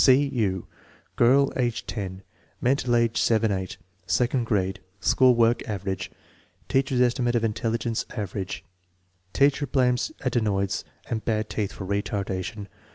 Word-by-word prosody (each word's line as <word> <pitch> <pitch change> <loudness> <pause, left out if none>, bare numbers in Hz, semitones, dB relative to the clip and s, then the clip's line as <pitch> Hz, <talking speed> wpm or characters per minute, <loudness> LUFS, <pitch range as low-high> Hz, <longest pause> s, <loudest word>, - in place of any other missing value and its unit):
C. 130 - +8
U. 100 -8 -1 0.5
Girl, 135 +4 +4
age 120 -3 -1
10; 95 -3 -5 0.4
mental 125 -1 +2
age 115 -1 +2
7 110 -1 +3
8; 95 -2 -3 0.3
second 125 0 +1
grade; 95 -3 0 0.2
school 130 -1 +4
work 115 0 +3
"average.'"; 95 -2 -3 0.6
teacher* 135 0 +1
$ - - +2
estimate 120 0 +1
of 115 - +1
intelligence 115 +1 -1
" - - -12
average" 100 -2 -4 0.7
Teacher 140 +1 +3
blames 125 - +1
adenoids 100 -3 0 0.2
and 110 -2 -3
bad 110 -1 -1
teeth 105 -2 -1
for 95 - -7
retardation. 100 +1 -2
115 Hz, 135 wpm, -26 LUFS, 100-125 Hz, 0.7 s, C